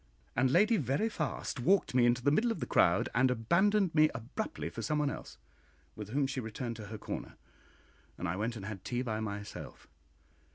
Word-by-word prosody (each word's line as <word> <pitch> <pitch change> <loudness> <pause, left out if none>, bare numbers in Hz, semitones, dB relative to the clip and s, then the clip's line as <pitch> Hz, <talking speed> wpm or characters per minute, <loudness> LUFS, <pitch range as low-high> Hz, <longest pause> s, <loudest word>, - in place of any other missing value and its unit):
And 130 +2 +3
Lady 215 - +4
Veriphast 150 - -1
walked 190 +8 +3
me 125 -1 +5
into 120 +1 +2
the 145 - +4
middle 220 +11 +3
of 225 - -3
the - - -2
crowd, - - +3
and 130 +2 +4
abandoned 180 - +2
me 155 0 +5
abruptly 120 - -4
for - - -6
somebody 150 -2 0
else, - - -8 0.6
with 105 -1 -7
whom 140 +4 +1
she 135 0 -3
returned 115 0 -4
to 105 -2 -8
her 110 +2 -6
corner, - - -6 0.8
and 90 - -3
I 85 - -1
went 110 +4 -2
and 100 -3 -7
had 100 -3 -6
tea 125 +1 -2
by 110 -3 -2
myself. 105 -1 -6
125 Hz, 190 wpm, -32 LUFS, 110-155 Hz, 0.8 s, me